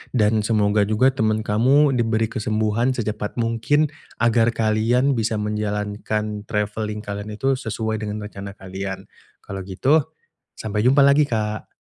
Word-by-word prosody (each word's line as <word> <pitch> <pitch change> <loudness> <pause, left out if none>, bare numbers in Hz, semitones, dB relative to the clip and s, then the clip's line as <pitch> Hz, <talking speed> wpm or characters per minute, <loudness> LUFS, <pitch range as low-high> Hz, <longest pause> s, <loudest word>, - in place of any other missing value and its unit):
Dan 110 -1 +3
semoga 105 -2 +2
juga 125 +5 +3
temen 110 -3 0
kamu 135 +7 +4
diberi 115 -2 +1
kesembuhan 110 +2 0
secepat 105 -2 -3
mungkin, 115 +6 +1 0.3
agar 115 0 +3
kalian 115 +5 +2
bisa 110 0 0
menjalankan 105 0 -2
travelling 105 0 -2
kalian 100 +1 -5
itu 135 +2 +1
sesuai 110 -2 -3
dengan 105 0 -4
rencana 100 -1 -8
kalian. 95 0 -6 0.4
Kalau 100 0 -6
gitu 130 +12 +2 0.6
sampai 105 -1 -2
jumpa 140 +3 +5
lagi, 140 +1 +4
Kak. 110 -2 -2
110 Hz, 130 wpm, -22 LUFS, 105-115 Hz, 0.6 s, jumpa